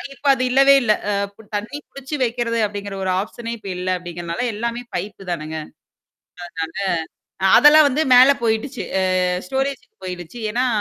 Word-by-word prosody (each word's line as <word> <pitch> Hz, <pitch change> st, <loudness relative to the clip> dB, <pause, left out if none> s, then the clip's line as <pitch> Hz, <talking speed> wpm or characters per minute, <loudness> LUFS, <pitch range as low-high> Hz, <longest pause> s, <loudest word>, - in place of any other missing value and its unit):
இப்ப 285 Hz, -, -22 dB
அது 255 Hz, -, -2 dB
இல்லவே 275 Hz, +1 st, +6 dB
இல்ல! 215 Hz, -, +3 dB, 0.2 s
அ -, -, 0 dB, 0.2 s
ப்ப 215 Hz, +1 st, -18 dB
தண்ணீ 230 Hz, +8 st, -6 dB
புடிச்சு 275 Hz, +2 st, -6 dB
வைக்கிறது, 230 Hz, -1 st, -1 dB
அப்படிங்கிற 200 Hz, -1 st, -6 dB
ஒரு 185 Hz, -, +1 dB
ஆப்ஷனே 230 Hz, +2 st, -6 dB
இப்ப 200 Hz, -, -8 dB
இல்ல, 185 Hz, +1 st, -3 dB
அப்டிங்கிறனால 175 Hz, +1 st, -5 dB
எல்லாமே 235 Hz, +2 st, -3 dB
பைப்பு 195 Hz, -2 st, -5 dB
தானேங்க. 160 Hz, -1 st, -4 dB, 1.6 s
அதனால 190 Hz, 0 st, -1 dB
அ -, -, +9 dB
அதெல்லாம் 300 Hz, +1 st, +7 dB
வந்து 290 Hz, +4 st, 0 dB
மேல 255 Hz, +3 st, +8 dB
போயிட்டுச்சு. 225 Hz, +4 st, -1 dB, 0.2 s
அ -, -, +1 dB, 0.4 s
ஸ்டோரேஜுக்கு 265 Hz, +1 st, -3 dB
போயிட்டுச்சு. 180 Hz, +5 st, -7 dB
ஏன்னா, 250 Hz, +2 st, +1 dB
230 Hz, 155 wpm, -20 LUFS, 195-260 Hz, 1.6 s, அ